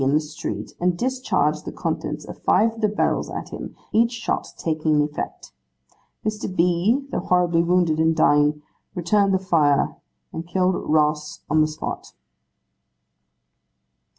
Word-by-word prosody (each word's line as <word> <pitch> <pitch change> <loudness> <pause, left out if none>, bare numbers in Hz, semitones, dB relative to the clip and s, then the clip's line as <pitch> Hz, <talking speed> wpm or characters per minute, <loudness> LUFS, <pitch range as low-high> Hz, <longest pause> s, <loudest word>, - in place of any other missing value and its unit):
in 135 +1 +2
the - - +5
street, 155 0 -6
and 180 0 +1
discharged 175 - 0
the - - -6
contents 155 -2 -3
of - - -10
five 225 +4 +3
of 225 - -10
the 215 - +4
barrels 210 - 0
at - - -6
him: - - -7 0.2
each 230 +2 +3
shot 235 -1 -2
taking 155 -1 +1
effect. 150 0 -5 0.7
Mr. 215 -1 -2
B., 180 +11 +2
though - - -1
horribly 175 -2 +2
wounded, 170 -2 +2
and 160 0 +3
dying, 150 -1 +3 0.3
returned 195 +3 +2
the 190 - +3
fire, 160 -7 +2 0.4
and 165 +1 -6
killed 185 +1 +1 0.2
Ross 150 0 +1
on 155 0 +4
the 155 - +3
spot. 155 0 -6
170 Hz, 145 wpm, -23 LUFS, 155-190 Hz, 0.7 s, the